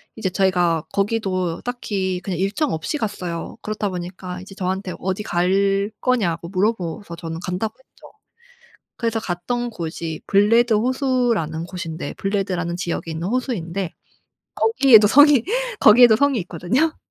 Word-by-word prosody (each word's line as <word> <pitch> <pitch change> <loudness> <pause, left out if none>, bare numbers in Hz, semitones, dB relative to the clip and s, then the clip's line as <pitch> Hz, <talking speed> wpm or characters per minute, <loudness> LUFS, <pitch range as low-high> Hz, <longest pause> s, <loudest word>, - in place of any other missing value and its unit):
이제 220 -4 -2
저희가 180 -4 +1
거기도 195 -4 -1
딱히 195 -7 -3
그냥 185 -4 -3
일정 210 +10 0
없이 160 - -2
갔어요. 180 -8 -4
그렇다 210 -1 -3
보니까 180 0 -6
이제 195 +1 -11
저한테 185 0 -3
어디 190 +3 -2
갈 195 +3 +1
거냐고 175 -10 0
물어봐서 190 -2 -2
저는 165 -1 -6
간다고 185 +5 -2
했죠. 265 - -19 0.9
그래서 230 -1 -1
갔던 240 +7 -3
곳이 165 -4 -5
블레드 225 +3 +4
호수라는 240 - 0
곳인데 170 -4 -6
블레드라는 190 -4 -2
지역에 170 -2 -3
있는 165 +3 -3
호수인데 195 - -2 0.6
거기에도 260 - +6
성이 290 0 +6 0.4
거기에도 230 +1 +7
성이 275 +1 +2
있거든요. 190 - -1
195 Hz, 330 characters per minute, -21 LUFS, 175-230 Hz, 0.9 s, 거기에도